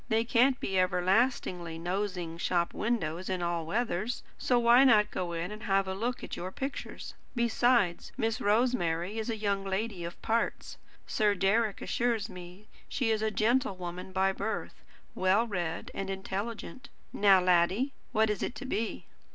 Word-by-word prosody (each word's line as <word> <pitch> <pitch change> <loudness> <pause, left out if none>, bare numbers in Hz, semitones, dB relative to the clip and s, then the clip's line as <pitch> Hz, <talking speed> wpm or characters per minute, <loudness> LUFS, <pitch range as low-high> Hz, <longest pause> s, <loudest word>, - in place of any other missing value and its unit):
They 225 0 +3
can't 245 +2 +3
be 190 -1 0
everlastingly 185 -2 +1
nosing 180 -1 -3
shop 175 -1 0
windows 185 -6 -2
in 185 -2 -1
all 170 -2 -1
weathers; 220 +2 -1
so 250 - +1
why 240 +2 +6
not 215 -5 +5
go 175 -2 -3
in 170 +3 -3
and 215 +1 -8
have 195 -2 +2
a 190 - -2
look 235 +6 -3
at - - -5
your 185 +2 -5
pictures? 270 +7 -6 0.2
Besides, 235 -5 +2
Miss 225 -3 -1
Rosemary 205 -4 +1
is 220 - -3
a 225 - -1
young 200 -2 -1
lady 195 -1 -2
of 170 +1 -7
parts. 230 +1 -1 0.3
Sir 210 -2 +2
Deryck 200 +3 +1
assures 230 -3 0
me 180 +2 -11 0.2
she 250 -5 0
is 215 -1 +1
a 220 - +1
gentlewoman 195 -6 -1
by 190 +1 +2
birth, 200 +3 -4 0.3
well 190 +5 +3
read 175 -7 -3
and 195 0 -4
intelligent. 205 +7 -5 0.2
Now, 195 -2 +6
laddie, 185 +9 +2 0.2
what 220 -2 +3
is 210 - -3
it - - -2
to 275 - -7
be?" 230 -4 -3
205 Hz, 160 wpm, -30 LUFS, 180-230 Hz, 0.3 s, why